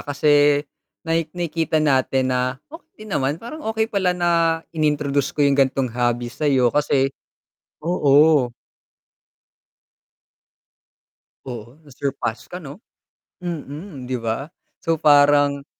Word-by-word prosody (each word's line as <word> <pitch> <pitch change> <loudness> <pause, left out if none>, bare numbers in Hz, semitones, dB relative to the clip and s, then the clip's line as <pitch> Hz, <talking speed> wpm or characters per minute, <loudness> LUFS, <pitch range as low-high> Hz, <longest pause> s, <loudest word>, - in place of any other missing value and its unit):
kasi 145 0 +3 0.4
naik 165 -1 0
nakikita 165 -2 -1
natin 130 -3 +2
na 125 +1 -1 0.2
okey 325 -9 -13
naman, 145 -8 -1
parang 240 - -9
okey 220 0 0
pala 195 -5 0
na 175 -1 +1 0.4
in-introduce 150 -3 0
ko 145 - +3
yung 140 - +3
ganong 135 -2 +1
hobby 120 0 -1
sa'yo 135 -5 +2
kasi 135 -2 +1 0.7
oo. 150 -4 +4 3.0
Oo, 120 0 -8
na-surpass 135 -4 -4
ka 180 - -7
'no, 145 +5 -10 0.6
mm, 150 -3 -7
'di 130 - -2
ba? 115 +5 -2 0.3
So 165 - 0
parang 145 -1 +4
145 Hz, 105 wpm, -21 LUFS, 135-160 Hz, 3.0 s, oo